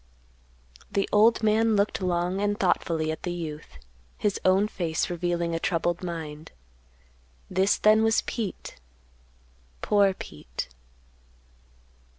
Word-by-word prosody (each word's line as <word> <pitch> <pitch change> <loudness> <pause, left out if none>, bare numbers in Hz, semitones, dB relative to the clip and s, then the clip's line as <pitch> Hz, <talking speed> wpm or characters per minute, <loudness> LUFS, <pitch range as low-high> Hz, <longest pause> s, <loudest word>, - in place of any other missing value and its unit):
The 200 -1 0
old 220 +2 +4
man 220 +1 +3
looked 200 0 +1
long 180 +1 0
and 205 +1 0
thoughtfully 165 -4 +1
at 160 - -6
the 175 - -3
youth, 160 -3 -7 0.4
his 205 -2 -1
own 190 +3 +4
face 170 -5 -2
revealing 175 -1 -1
a 165 - -1
troubled 175 0 -1
mind. 160 -3 -6 1.0
This 190 +2 +2
then 215 +1 +5
was 225 0 +3
Pete, 220 -5 -5 1.1
Poor 200 -2 +3
Pete. 75 - -7
185 Hz, 115 wpm, -26 LUFS, 170-205 Hz, 1.1 s, then